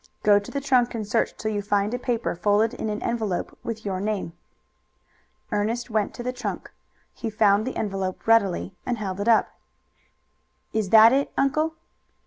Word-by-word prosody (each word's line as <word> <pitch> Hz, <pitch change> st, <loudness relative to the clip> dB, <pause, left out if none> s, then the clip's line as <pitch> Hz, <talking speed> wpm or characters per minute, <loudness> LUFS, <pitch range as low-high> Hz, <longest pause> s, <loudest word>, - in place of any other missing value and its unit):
Go 205 Hz, -1 st, +6 dB
to 200 Hz, -, -10 dB
the 280 Hz, -, -3 dB
trunk 255 Hz, -3 st, +2 dB
and 215 Hz, -3 st, -4 dB
search 225 Hz, +2 st, 0 dB
till 215 Hz, -, -2 dB
you 205 Hz, -1 st, -1 dB
find 205 Hz, +1 st, 0 dB
a 245 Hz, -, -2 dB
paper 240 Hz, -2 st, -1 dB
folded 210 Hz, +6 st, +2 dB
in 220 Hz, -, -4 dB
an 210 Hz, +1 st, -4 dB
envelope 220 Hz, -6 st, -2 dB
with 220 Hz, -2 st, -5 dB
your 190 Hz, -2 st, -2 dB
name." 205 Hz, -5 st, -2 dB, 1.2 s
Ernest 230 Hz, +3 st, -1 dB
went 215 Hz, -2 st, 0 dB
to 240 Hz, -, -6 dB
the 250 Hz, +1 st, -2 dB
trunk. 250 Hz, 0 st, -5 dB, 0.4 s
He 230 Hz, -, -4 dB
found 210 Hz, +1 st, +3 dB
the 260 Hz, -, -4 dB
envelope 195 Hz, -3 st, -3 dB
readily, 200 Hz, -4 st, +2 dB
and 245 Hz, -1 st, -2 dB
held 195 Hz, -3 st, -4 dB
it 205 Hz, -, -2 dB
up. 230 Hz, -2 st, +4 dB, 1.2 s
"Is 215 Hz, -3 st, -1 dB
that 225 Hz, +3 st, +8 dB
it, 275 Hz, +1 st, +1 dB
uncle?" 310 Hz, +4 st, +1 dB
220 Hz, 175 wpm, -24 LUFS, 205-240 Hz, 1.2 s, that